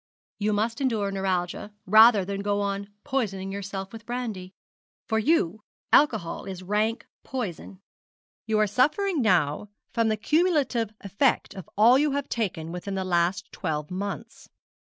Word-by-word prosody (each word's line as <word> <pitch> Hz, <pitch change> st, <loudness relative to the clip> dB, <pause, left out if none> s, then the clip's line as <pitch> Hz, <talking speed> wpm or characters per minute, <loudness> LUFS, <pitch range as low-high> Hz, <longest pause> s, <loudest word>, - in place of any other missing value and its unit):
'You 210 Hz, +1 st, +1 dB
must 225 Hz, +5 st, -1 dB
endure 220 Hz, -7 st, 0 dB
neuralgia 190 Hz, 0 st, -2 dB
rather 215 Hz, 0 st, +7 dB
than 200 Hz, +1 st, -3 dB
go 205 Hz, 0 st, 0 dB
on 200 Hz, 0 st, -2 dB
poisoning 195 Hz, -7 st, -2 dB
yourself 195 Hz, 0 st, -5 dB
with 225 Hz, -1 st, -10 dB
brandy. 220 Hz, -7 st, -5 dB, 0.5 s
For 220 Hz, -1 st, 0 dB
you 220 Hz, -, +1 dB, 0.3 s
alcohol 220 Hz, -, +3 dB
is 190 Hz, -2 st, -7 dB
rank 210 Hz, +4 st, 0 dB, 0.2 s
poison 200 Hz, -6 st, -5 dB, 0.7 s
you 220 Hz, -1 st, +1 dB
are 215 Hz, -, +4 dB
suffering 295 Hz, -, +1 dB
now 180 Hz, -3 st, +2 dB, 0.2 s
from 230 Hz, -1 st, +2 dB
the 215 Hz, -1 st, +1 dB
cumulative 290 Hz, -, +1 dB
effect 205 Hz, +7 st, +1 dB
of 190 Hz, -, -10 dB
all 235 Hz, +5 st, +6 dB
you 295 Hz, -1 st, +2 dB
have 285 Hz, 0 st, -2 dB
taken 170 Hz, -8 st, -2 dB
within 180 Hz, +3 st, -5 dB
the 190 Hz, -, -1 dB
last 180 Hz, +2 st, 0 dB
twelve 150 Hz, -3 st, -3 dB
months. 200 Hz, +2 st, -6 dB
205 Hz, 145 wpm, -26 LUFS, 190-235 Hz, 0.7 s, rather